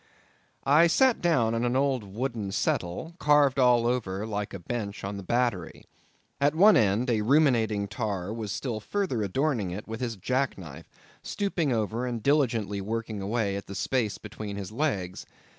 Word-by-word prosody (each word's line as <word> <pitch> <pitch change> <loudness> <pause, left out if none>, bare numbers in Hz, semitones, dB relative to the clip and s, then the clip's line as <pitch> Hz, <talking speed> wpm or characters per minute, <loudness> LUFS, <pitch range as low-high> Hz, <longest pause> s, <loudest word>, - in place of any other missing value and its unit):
I 150 +5 +6
sat 255 +8 +3
down 125 -11 +2
on 115 +1 0
an 120 +1 0
old 135 -3 +1
wooden 110 0 -4
settle, 95 - -2
carved 145 -2 +4
all 125 -2 +4
over 110 -5 -1
like 105 -2 -3
a - - -5
bench 100 +2 -5
on 100 +1 -4
the - - -6
Battery. 115 -4 -1 0.5
At 145 +2 +2
one 205 +5 +7
end 110 +4 +2
a 110 -2 +1
ruminating 115 -6 +2
tar 105 -3 -3
was 110 -3 -5
still 120 -2 -3
further 175 - -2
adorning 115 0 0
it 95 +5 -6
with 110 +2 -6
his 120 -3 -2
jack 130 +7 -1
knife, 80 -7 -10 0.3
stooping 180 -8 -1
over 115 +2 -1
and 120 -3 -4
diligently 115 -9 +1
working 110 0 -4
away 100 0 -1
at 100 - -6
the 100 - -7
space 110 -5 -1
between 105 -1 -7
his 100 0 -6
legs. 105 -9 -2
115 Hz, 170 wpm, -27 LUFS, 100-135 Hz, 0.5 s, one